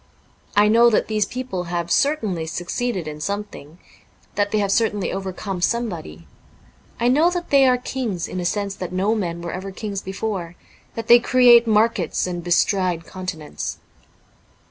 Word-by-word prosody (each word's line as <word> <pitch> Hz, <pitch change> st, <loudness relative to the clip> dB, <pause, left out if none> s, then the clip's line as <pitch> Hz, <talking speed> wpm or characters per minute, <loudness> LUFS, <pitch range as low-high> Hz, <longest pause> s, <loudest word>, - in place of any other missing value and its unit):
I 205 Hz, +1 st, +5 dB
know 230 Hz, +2 st, +6 dB
that 220 Hz, -, +1 dB
these 215 Hz, -2 st, +1 dB
people 250 Hz, -8 st, -4 dB
have 170 Hz, 0 st, -3 dB
certainly 215 Hz, -, +1 dB
succeeded 180 Hz, +2 st, -3 dB
in 150 Hz, 0 st, -7 dB
something; 200 Hz, -5 st, -5 dB, 0.6 s
that 205 Hz, 0 st, 0 dB
they 215 Hz, -, 0 dB
have 200 Hz, -2 st, +1 dB
certainly 210 Hz, -3 st, +1 dB
overcome 190 Hz, -1 st, -4 dB
somebody; 175 Hz, -, -2 dB, 0.7 s
I 235 Hz, -, +2 dB
know 300 Hz, +7 st, +4 dB
that 355 Hz, -1 st, -4 dB
they 275 Hz, -2 st, +6 dB
are 250 Hz, -1 st, +4 dB
kings 245 Hz, -8 st, -3 dB
in 185 Hz, -, -5 dB
a 175 Hz, -, -3 dB
sense 200 Hz, +2 st, -1 dB
that 180 Hz, -2 st, -5 dB
no 190 Hz, +4 st, +1 dB
men 170 Hz, -6 st, -3 dB
were 170 Hz, -, -4 dB
ever 190 Hz, +2 st, -5 dB
kings 200 Hz, 0 st, -5 dB
before; 190 Hz, -3 st, -4 dB, 0.4 s
that 230 Hz, -, -4 dB
they 240 Hz, 0 st, +8 dB
create 240 Hz, -1 st, +6 dB
markets 220 Hz, +1 st, +2 dB
and 175 Hz, -1 st, -4 dB
bestride 175 Hz, -1 st, +1 dB
continents. 165 Hz, -, -6 dB
200 Hz, 160 wpm, -22 LUFS, 175-230 Hz, 0.7 s, they